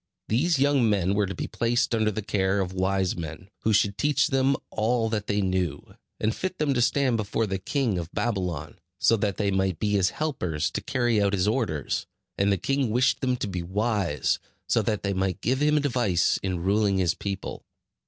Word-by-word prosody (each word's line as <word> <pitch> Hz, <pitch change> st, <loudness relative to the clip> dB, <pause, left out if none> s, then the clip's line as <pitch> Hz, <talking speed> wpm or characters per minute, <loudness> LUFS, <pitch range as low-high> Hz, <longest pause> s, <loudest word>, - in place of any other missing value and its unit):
These 145 Hz, +9 st, +2 dB
young 135 Hz, -4 st, +3 dB
men 100 Hz, -2 st, +1 dB
were 100 Hz, -1 st, +1 dB
to 95 Hz, -, -5 dB
be -, -, -3 dB
placed 120 Hz, +1 st, 0 dB
under 110 Hz, -2 st, +2 dB
the 105 Hz, 0 st, -4 dB
care 95 Hz, -1 st, +1 dB
of 95 Hz, -1 st, -2 dB
wise 95 Hz, 0 st, 0 dB
men, 85 Hz, +3 st, -7 dB
who 110 Hz, -, 0 dB
should 100 Hz, -1 st, +2 dB
teach 145 Hz, -2 st, +2 dB
them 135 Hz, +1 st, +2 dB, 0.2 s
all 115 Hz, +1 st, +1 dB
that 105 Hz, -2 st, -2 dB
they 100 Hz, 0 st, +1 dB
knew, 90 Hz, -6 st, -2 dB, 0.3 s
and 110 Hz, +1 st, +1 dB
fit 185 Hz, 0 st, -3 dB
them 150 Hz, -2 st, +1 dB
to 125 Hz, -, +1 dB
stand 130 Hz, 0 st, +2 dB
before 110 Hz, +1 st, -1 dB
the 95 Hz, -2 st, -3 dB
king 130 Hz, -, 0 dB
of 85 Hz, +1 st, -6 dB
Babylon, 95 Hz, -6 st, -3 dB, 0.2 s
so 115 Hz, -, +4 dB
that 100 Hz, -2 st, -1 dB
they 100 Hz, -2 st, +1 dB
might 95 Hz, -2 st, 0 dB
be 105 Hz, +4 st, -1 dB
his 95 Hz, -3 st, +3 dB
helpers 90 Hz, -, -2 dB
to -, -, -3 dB
carry 120 Hz, -4 st, +1 dB
out 100 Hz, -1 st, +2 dB
his 95 Hz, 0 st, +1 dB
orders; 105 Hz, -, -1 dB, 0.3 s
and 100 Hz, +1 st, +2 dB
the 100 Hz, -, +2 dB
king 135 Hz, +5 st, 0 dB
wished 125 Hz, +4 st, +2 dB
them 125 Hz, -2 st, +1 dB
to 105 Hz, -, -3 dB
be 90 Hz, -3 st, -3 dB
wise, 95 Hz, -, 0 dB, 0.3 s
so 115 Hz, -, +3 dB
that 105 Hz, -1 st, -1 dB
they 100 Hz, -1 st, 0 dB
might 95 Hz, -2 st, -1 dB
give 130 Hz, +4 st, 0 dB
him 150 Hz, 0 st, +3 dB
advice 120 Hz, -, +1 dB
in 90 Hz, -3 st, -2 dB
ruling 100 Hz, 0 st, +2 dB
his 90 Hz, -2 st, +2 dB
people. 100 Hz, -1 st, -5 dB
105 Hz, 205 wpm, -26 LUFS, 95-120 Hz, 0.3 s, so